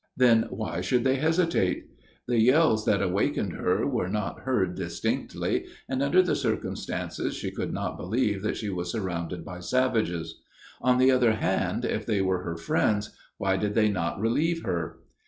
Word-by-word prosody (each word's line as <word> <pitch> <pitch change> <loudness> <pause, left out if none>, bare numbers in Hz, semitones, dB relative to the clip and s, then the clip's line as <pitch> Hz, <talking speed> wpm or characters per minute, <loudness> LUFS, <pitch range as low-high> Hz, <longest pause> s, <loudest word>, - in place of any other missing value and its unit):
Then 120 -3 +5
why 110 -5 -3
should 120 +7 +1
they 130 0 +2
hesitate? 160 - +1 0.4
The 120 -1 +2
yells 125 -2 +4
that 100 -2 +2
awakened 95 +1 0
her - - 0
were 90 - -1
not 105 0 -2
heard 100 -9 0
distinctly, - - -2 0.2
and 130 0 -1
under 175 +7 +4
the 180 - +1
circumstances 115 -5 -2
she - - -4
could - - -4
not - - -3
believe 105 0 0
that 110 - -2
she 105 -3 -3
was 90 -1 -3
surrounded 90 -5 -3
by 90 -2 -7
savages. 90 -8 0 0.4
On 125 0 +3
the 130 +1 +5
other 125 -3 +4
hand, 110 - 0
if - - -2
they 105 - +1
were 95 -1 0
her 85 -2 -4
friends, 105 +5 0 0.3
why 95 -1 +1
did 105 +1 -1
they 110 -2 +4
not 90 -3 -2
relieve 155 +10 +1
her? 85 -4 -3
105 Hz, 170 wpm, -27 LUFS, 90-125 Hz, 0.4 s, Then